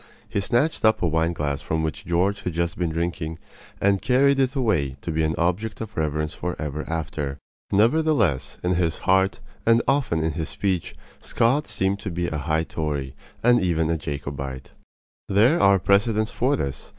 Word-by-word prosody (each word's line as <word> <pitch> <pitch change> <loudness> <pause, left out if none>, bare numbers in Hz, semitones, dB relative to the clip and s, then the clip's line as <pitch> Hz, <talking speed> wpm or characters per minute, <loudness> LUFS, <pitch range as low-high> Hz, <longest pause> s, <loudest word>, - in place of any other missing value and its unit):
He 105 -2 -1
snatched 120 +10 +1
up 110 -3 +3
a - - +3
wine 80 +1 +1
glass 75 -4 -2
from 80 0 -1
which 80 - -4
George 95 +4 +1
had 90 - -3
just 85 +1 -1
been 85 -2 -1
drinking 80 -1 -3 0.4
and 100 -1 +2
carried 135 +2 +3
it 135 +1 +1
away 80 - +1
to 85 - -4
be 80 0 0
an 80 -1 +1
object 95 +5 -1
of 110 -1 -7
reverence 75 -1 -1
for 90 0 -4
ever 75 0 -4
after. 75 -4 -3 0.3
Nevertheless, 115 - +2
in 90 +1 +1
his 85 -2 0
heart, 95 +1 +3 0.2
and 115 0 +4
often 125 - +1
in 80 - +1
his 80 +1 -4
speech, 95 -4 -2 0.2
Scott 135 +6 +1
seemed 95 +1 -1
to 100 - -5
be 85 0 -2
a 80 -3 -2
high 80 +2 0
Tory, 75 -5 -3 0.3
and 120 +1 +5
even 80 -3 +1
a - - +2
Jacobite. 70 -2 -5 0.6
There 115 - +4
are 100 0 +6
precedents 105 +3 +2
for 135 +4 +1
this. 70 - -4
85 Hz, 180 wpm, -24 LUFS, 80-110 Hz, 0.6 s, are